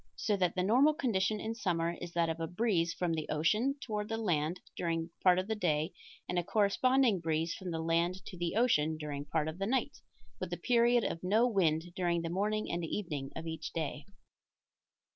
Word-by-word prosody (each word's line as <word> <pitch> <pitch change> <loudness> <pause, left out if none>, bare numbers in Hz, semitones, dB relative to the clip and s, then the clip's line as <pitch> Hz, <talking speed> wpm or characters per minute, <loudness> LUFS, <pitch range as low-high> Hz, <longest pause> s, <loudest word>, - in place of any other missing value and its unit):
So 210 - 0
that 180 -3 +1
the 180 - +1
normal 260 +10 +4
condition 215 -7 0
in 220 +2 -3
summer 170 -7 0
is 175 - -6
that 170 -1 +2
of 165 0 -3
a 165 - -2
breeze 175 -3 +1
from 175 -1 -1
the 155 -1 -3
ocean 215 - +2
toward 210 -5 -4
the 225 - -1
land 175 -5 0 0.2
during 165 -1 -2
part 180 -1 +5
of 185 - 0
the 220 - 0
day 160 -5 0 0.3
and 180 - 0
a - - -1
corresponding 220 +3 +3
breeze 165 0 -1
from 190 -2 -6
the 160 -1 -3
land 170 +3 0
to - - -8
the 175 +1 -2
ocean 160 -10 +3
during 145 -2 -5
part 155 +1 0
of 160 +3 -5
the 195 - -1
night, 260 +3 -1 0.4
with - - -4
a - - -2
period 240 -1 +3
of 165 - -2
no 215 +6 +3
wind 175 -6 +1
during 175 -2 0
the 165 - -2
morning 210 +3 -1
and 170 0 -2
evening 155 -6 -3
of 160 - -6
each 160 -1 -5
day. 150 -2 -4
175 Hz, 205 wpm, -32 LUFS, 165-215 Hz, 0.4 s, part